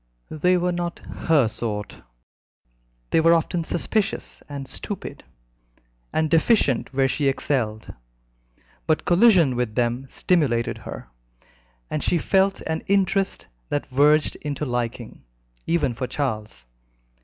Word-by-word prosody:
They 180 +4 +2
were 180 0 0
not 175 -1 -3
"her 150 -7 +2
sort," 105 -2 -4 1.1
they 160 - +4
were 165 +1 +6
often 165 +1 0
suspicious 195 +5 -2
and 140 -2 -6
stupid, 200 +8 -6 0.9
and 160 - +1
deficient 160 - +2
where 135 0 +2
she 140 +2 0
excelled; 120 -5 -1 0.9
but 155 - +1
collision 175 - +5
with 120 -3 -2
them 120 +2 0
stimulated 135 -11 +1
her, - - -9 0.8
and 155 - -3
she 175 - +2
felt 195 +3 +2
an 160 0 -3
interest 195 0 +1 0.2
that 145 - -1
verged 150 +3 +3
into 150 0 -4
liking, 120 -2 -4 0.4
even 155 -7 +1
for 125 +2 -4
Charles. 110 - -4
150 Hz, 120 wpm, -23 LUFS, 125-175 Hz, 1.1 s, were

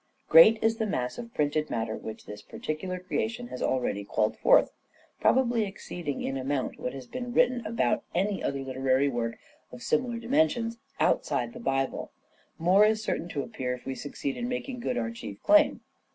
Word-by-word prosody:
Great 165 +8 +8
as 225 - +5
is 225 - -10
the 220 - 0
mass 125 - -2
of 235 -1 -7
printed 150 -1 0
matter 110 -1 -2
which 110 - -8
this 105 0 -9
Hamlet - - -26
and - - -9
particular 180 +4 -3
creation 225 +6 -3
has 125 - -7
already 120 -6 0
called 110 +2 0
forth, - - +5 0.5
probably 245 -2 +3
Destiny 210 -3 0
exceeding 170 -6 -5
in 135 - -2
amount 135 0 -2
what 125 - -3
has 135 -2 -8
been 245 - -6
written 245 0 +3
about 215 - 0
any 195 +3 0
other 140 -1 -2
literary 130 +1 +1
work 115 -2 -2 0.3
of 125 -1 -10
similar 240 0 0
dimensions 235 -2 +1 0.2
outside 235 - +1
the 235 - -9
Bible, 135 - -1 0.5
more 185 +5 +5
is 215 0 +2
certain 170 - -2
to 145 -4 -2
appear 125 +1 -3
if 125 - -15
we 135 - -3
succeed 140 +1 -4
in 240 0 -3
making 250 0 -4
good 245 +1 -2
our 230 - -1
chief 235 - -8
claim. 310 0 +5
175 Hz, 195 wpm, -28 LUFS, -, 0.5 s, Great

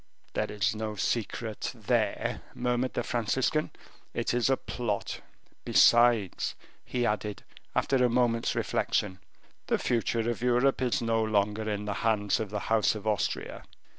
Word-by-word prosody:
"There - - -1
is 105 0 0
no 110 0 -3
secret 110 +1 -2
there," - - 0
murmured 125 +1 -1
the 120 - 0
Franciscan, 125 +6 0 0.5
"it - - 0
is 120 +1 +2
a 135 - +3
plot. 110 -5 -3 0.4
Besides," 120 -5 +4 0.3
he 125 -1 -1
added, 105 -1 -2 0.3
after 135 - +2
a 125 - +4
moment's 120 -1 +1
reflection, 95 -3 0 0.5
"the - - +2
future 115 0 0
of 120 -1 -2
Europe 125 +2 +2
is 125 -2 +1
no 115 -1 +1
longer 105 0 0
in 105 0 -2
the 105 - -2
hands 105 -2 +2
of 110 -2 -3
the 105 0 -3
House 110 -1 +2
of 110 0 -7
Austria." 105 -2 -1
115 Hz, 145 wpm, -29 LUFS, 105-120 Hz, 0.5 s, Besides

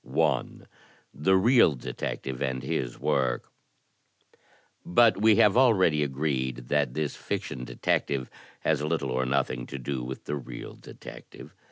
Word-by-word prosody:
I. - - +1 0.7
The 95 +6 +3
Real 115 - +5
Detective 65 +1 -5
and 65 -2 -2
His 60 -2 -3
Work 65 -3 -1 1.3
But 110 +2 +4
we 110 0 +6
have 105 +1 +5
already 95 -12 +4
agreed 65 -3 -2
that 70 -4 +1
this 75 -2 -2
fiction 60 -2 -4
detective 65 0 -1 0.3
has 75 -2 +1
little 75 -3 -1
or 65 0 0
nothing 65 -2 -1
to 70 - -6
do 65 0 -4
with 65 +2 -6
the 75 - -2
real 65 -3 -8
detective. - - -12
70 Hz, 135 wpm, -27 LUFS, 65-85 Hz, 1.3 s, we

